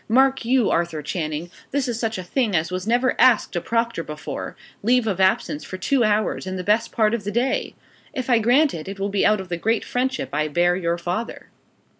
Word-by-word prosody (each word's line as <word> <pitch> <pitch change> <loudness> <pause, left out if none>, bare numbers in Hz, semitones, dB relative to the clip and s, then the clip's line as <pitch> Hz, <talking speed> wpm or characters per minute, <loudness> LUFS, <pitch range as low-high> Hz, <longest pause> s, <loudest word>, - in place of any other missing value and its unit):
Mark 265 +3 +3
you, 245 -1 +2
Arthur 165 -3 -1
Channing, 160 0 -4 0.2
this 280 -1 -1
is 235 -2 -2
such 225 -3 -1
a 185 - -5
thing 215 +2 0
as 160 +2 0
was 185 +2 -4
never 245 +2 +2
asked 235 -7 +4
a 175 - 0
proctor 230 -3 -1
before 150 -1 -6 0.2
leave 245 +2 +3
of 195 -4 -1
absence 190 -5 +1
for 185 - -7
two 245 +7 +1
hours 210 -2 0
in 185 - -3
the 180 - -4
best 220 +4 +1
part 215 -1 +2
of 235 -3 -2
the 200 - -3
day! 240 +5 -1 0.4
If 255 -2 -4
I 240 -3 +4
grant 265 +7 +3
it, 160 +1 -6
it 195 0 -7
will 200 +1 -1
be 200 -1 +2
out 210 -1 +3
of 190 -1 -7
the 175 - -2
great 225 +6 0
friendship 260 +1 -2
I 155 +1 +1
bear 175 +4 +2
your 170 -2 -1
father." 180 +6 -4
210 Hz, 225 wpm, -22 LUFS, 175-240 Hz, 0.4 s, asked